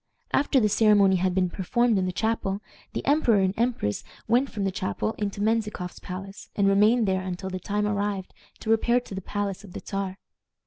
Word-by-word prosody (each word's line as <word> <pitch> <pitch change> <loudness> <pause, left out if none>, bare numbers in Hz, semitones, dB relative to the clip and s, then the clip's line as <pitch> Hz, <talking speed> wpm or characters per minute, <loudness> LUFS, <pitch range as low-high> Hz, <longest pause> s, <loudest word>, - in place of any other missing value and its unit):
After 275 -1 +3
the 215 - +3
ceremony 205 -2 +5
had 180 0 0
been 185 -2 +1
performed 225 +4 +1
in 185 - 0
the - - -1
chapel, 200 -1 -1 0.3
the - - -4
emperor 250 -8 +4
and 190 0 +2
empress 230 - -1 0.2
went 245 +4 +3
from 205 - -4
the 195 - +1
chapel 105 - -2
into 200 -1 -2
Menzikoff's 215 -4 -1
palace, 195 +2 -8
and 200 -1 +3
remained 210 +3 +4
there 190 -1 +1
until 185 +1 -5
the 185 - -3
time 210 +3 -1
arrived 205 -2 -2 0.3
to 220 - -1
repair 235 +2 +3
to 245 - -11
the 190 - -4
palace 200 0 -3
of 190 -4 -12
the - - -6
Czar. 195 -1 -3
200 Hz, 195 wpm, -26 LUFS, 190-220 Hz, 0.3 s, ceremony